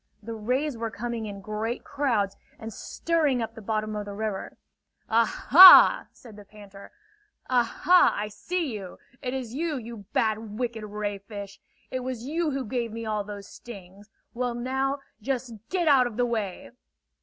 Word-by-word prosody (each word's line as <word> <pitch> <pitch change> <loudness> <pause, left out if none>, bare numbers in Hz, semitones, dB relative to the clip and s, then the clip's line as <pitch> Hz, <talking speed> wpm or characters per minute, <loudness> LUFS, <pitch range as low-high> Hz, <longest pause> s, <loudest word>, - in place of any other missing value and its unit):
The 230 +2 -6
rays 250 +5 -2
were 230 0 -2
coming 230 0 -5
in 200 -1 -8
great 215 +3 -4
crowds 235 -9 -1 0.2
and 225 0 -8
stirring 310 -3 0
up 225 -1 -4
the 225 - -11
bottom 215 0 -2
of 210 -1 -4
the 200 0 -7
river. 210 -2 -4 0.5
"Ah 230 +1 +3 0.2
hah!" 365 +6 +10
said 225 -4 -15
the 205 - -11
panther: 200 -1 -14 0.6
"Ah 250 -1 +5 0.2
hah! 360 0 +6
I 210 - -2
see! 325 - -3
It 245 +6 -9
is 245 -4 -5
you, 310 +1 -2
you 230 -4 -9
bad, 220 -1 -1
wicked 235 -3 -3
ray 205 -1 -4
fish! 200 -1 -9 0.3
It 255 - -2
was 250 -2 -5
you 320 +3 -1
who 270 -2 -3
gave 235 0 -3
me 230 +1 -6
all 215 -1 -1
those 200 -1 -9
stings! 200 -2 -12 0.2
Well 245 0 -2
now, 265 +3 -2 0.2
just 255 0 -3 0.2
get 360 -3 0
out 265 -4 +5
of 230 -2 -9
the 245 - +2
way!" 220 -6 -4
230 Hz, 170 wpm, -26 LUFS, 210-255 Hz, 0.6 s, hah